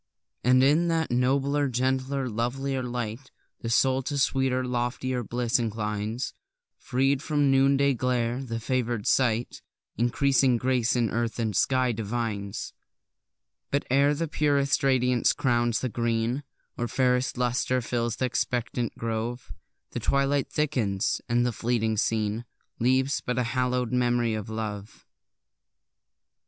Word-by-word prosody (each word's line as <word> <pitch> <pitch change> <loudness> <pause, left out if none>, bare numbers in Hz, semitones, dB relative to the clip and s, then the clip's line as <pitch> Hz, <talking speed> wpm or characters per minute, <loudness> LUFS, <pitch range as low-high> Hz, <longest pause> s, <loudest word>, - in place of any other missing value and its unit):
And 130 +1 +5
in 155 +5 +4
that 165 -3 0
nobler, 140 +3 +2
gentler, 130 +2 0
lovelier 130 +4 -2
light, 120 +1 -4 0.3
The 115 - -4
soul 130 +2 +3
to 140 +2 -3
sweeter, 130 -2 +1
loftier 125 +1 -2
bliss 120 +1 0
inclines; 110 +1 -3 0.5
Freed 135 +1 +1
from 150 -1 0
the 135 -1 +4
noonday 140 +1 +3
glare, 125 0 0
the 115 -3 -4
favour'd 120 -2 -1
sight 120 -2 +1 0.4
Increasing 130 +1 +3
grace 125 -1 +1
in 120 -3 +1
earth 115 0 -1
and 110 -4 -1
sky 130 +6 +2
divines. 105 -2 -3 1.0
But 140 - 0
ere 140 +2 +4
the 165 +2 -2
purest 145 -2 +1
radiance 125 -2 +3
crowns 120 -3 +1
the 130 - 0
green, 115 +3 -1 0.3
Or 120 - 0
fairest 125 0 +1
lustre 125 +1 +1
fills 120 -1 -2
th' - - -3
expectant 120 -1 -1
grove, 115 -2 -3 0.4
The - - -3
twilight 140 0 +1
thickens, 120 -11 0
and 120 +1 +2
the 125 - +1
fleeting 115 -1 0
scene 110 +1 0 0.3
Leaves 130 +3 +2
but 125 0 -2
a 125 - +2
hallow'd 125 0 -1
memory 120 -2 +2
of 110 -1 -4
love! 110 -1 -6
125 Hz, 130 wpm, -27 LUFS, 115-135 Hz, 1.0 s, And